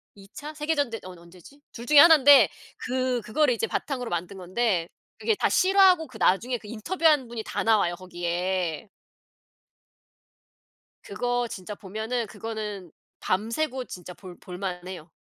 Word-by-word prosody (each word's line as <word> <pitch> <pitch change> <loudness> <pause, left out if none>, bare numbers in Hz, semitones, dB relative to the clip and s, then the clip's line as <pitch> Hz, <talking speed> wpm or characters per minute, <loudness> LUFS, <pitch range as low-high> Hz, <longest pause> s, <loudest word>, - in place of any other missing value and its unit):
2 195 -1 -15
차? 300 +2 -8
세계 305 +1 -2
전쟁 240 -7 -1
언 185 -1 -10
언제지? 180 - -17
2 235 0 -9
중에 295 +1 +6
1 330 +1 +9
인데 270 - +7 0.3
그 255 -1 -2
그거를 270 +4 +1
이제 225 -1 -2
바탕으로 250 -5 -3
만든 175 +3 -4
건데 185 -1 -1 0.3
그게 445 - 0
다 - - +1
실화고 375 -3 +4
그 240 -3 -12
나중에 240 +7 +1
그 215 - -14
인터뷰한 295 - +1
분이 230 -2 -6
다 - - -3
나와요 205 -6 +2
거기에. 175 -1 -3 2.1
그거 245 0 -2
진짜 195 +1 -7
보면은 220 +4 -4
그거는 210 -4 -6 0.3
밤 205 +5 -1
새고 260 -1 -2
진짜 180 -3 -10
볼 180 -1 -12
볼만해요. 180 -2 -7
225 Hz, 280 characters per minute, -26 LUFS, 185-260 Hz, 2.1 s, 1